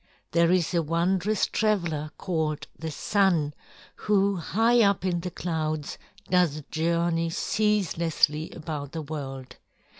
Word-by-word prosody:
"There 170 +1 +4
is 185 -1 +2
a 170 - +3
wondrous 180 +6 +1
traveler 170 -9 0
called 160 -4 -2
the 160 - -5
Sun 170 -3 +1 0.4
who 200 -1 +2
high 225 +7 +3
up 200 -3 +3
in 175 -2 +1
the 180 +2 -4
clouds 155 -4 -3 0.3
does 170 -5 +2
journey 165 +1 +1
ceaselessly 170 -6 +1
about 150 -3 -6
the 160 -1 -4
world. 135 -3 -7
170 Hz, 120 wpm, -26 LUFS, 155-190 Hz, 0.4 s, There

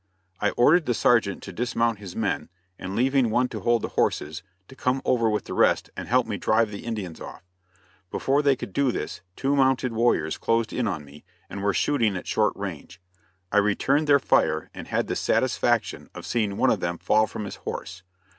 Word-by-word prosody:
I 105 - +2
ordered 155 +7 +5
the 120 - +1
sergeant 110 -6 +2
to 95 - -8
dismount 115 0 0
his 95 -4 -9
men, 105 -4 -2 0.3
and 95 +2 -5
leaving 130 0 +2
one 125 +3 +1
to 110 - -5
hold 120 +3 +1
the - - -2
horses, 75 +2 -1 0.3
to 130 - -14
come 130 0 0
over 115 -3 +2
with 105 -1 -1
the - - -6
rest - - +2
and - - -6
help - - +3
me - - -3
drive 110 -1 +2
the 100 - -8
Indians 105 -8 -5
off. - - -9 0.7
Before 140 +2 +1
they 140 -2 +3
could 100 - -8
do 140 -2 +2
this, 85 -3 -5
two 140 +1 0
mounted 130 -2 +2
warriors 110 -9 +1
closed 115 0 0
in 125 -3 0
on 80 -7 -3
me 70 +1 -15 0.3
and 100 - -5
were 100 0 +2
shooting 115 -3 +1
at - - -7
short 105 -1 +1
range. 90 -3 -7 0.5
I 105 - +2
returned 130 +9 +2
their 145 -1 +6
fire 80 - +1
and - - -9
had - - 0
the - - -3
satisfaction - - 0
of - - -8
seeing 105 -4 -1
one 130 - +3
of - - +1
them 85 0 -2
fall 110 +4 +2
from 105 - -6
his 100 - -7
horse. 95 +2 -6
110 Hz, 205 wpm, -25 LUFS, 100-125 Hz, 0.7 s, their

